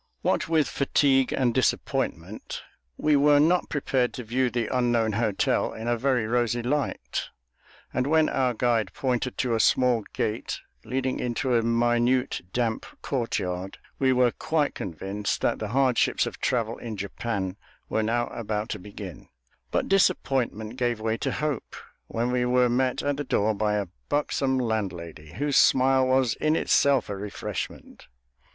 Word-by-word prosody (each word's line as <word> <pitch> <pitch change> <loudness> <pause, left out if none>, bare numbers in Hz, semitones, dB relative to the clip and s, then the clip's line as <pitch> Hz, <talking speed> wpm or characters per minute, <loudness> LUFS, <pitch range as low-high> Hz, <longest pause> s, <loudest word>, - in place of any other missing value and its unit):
What - - +1
with 160 -3 +3
fatigue 135 -1 +2
and 125 -3 +1
disappointment, 130 -1 -1 0.3
we 150 -1 +3
were 145 +1 +5
not 175 +4 +3
prepared 130 -5 0
to 125 - -5
view 125 +3 0
the 120 0 -2
unknown 120 -3 +2
hotel 105 -1 0
in 110 +1 -6
a 120 - +2
very 125 -1 +1
rosy 120 0 0
light; 145 +3 -2 0.6
and 130 +1 0
when 160 +1 +4
our 125 -2 0
guide 115 -5 +1
pointed 130 -1 -1
to 125 -2 0
a 115 - +1
small 125 -1 +3
gate 110 +1 -2 0.2
leading 130 0 -2
into 125 +2 -1
a 115 - +4
minute, 120 +2 +1
damp 115 -1 -1 0.2
courtyard, 95 -8 -2 0.2
we 130 -1 +3
were 125 -1 +4
quite 155 +2 0
convinced 95 +3 -3
that - - +1
the 110 - -3
hardships 130 +2 +2
of - - -6
travel 115 -2 -1
in 110 -3 -6
Japan 100 -1 -3 0.3
were 110 - 0
now 120 +2 +1
about 110 -1 -3
to 105 - -4
begin; 95 -3 -9 0.4
but - - 0
disappointment 125 - +1
gave 120 -3 0
way 110 0 0
to - - -2
hope, 150 -5 -3 0.3
when 120 +2 -1
we 125 0 +1
were 125 0 +3
met 130 +1 +1
at 145 -1 0
the 145 - -2
door 110 -5 +1
by 105 0 0
a 105 -1 0 0.2
buxom 140 -2 +1
landlady, 85 -10 -3
whose 145 0 0
smile 130 0 +5
was 130 -2 +3
in 155 +1 +3
itself 140 -6 +3
a 100 - -4
refreshment. 100 +1 -6
120 Hz, 155 wpm, -26 LUFS, 110-130 Hz, 0.6 s, were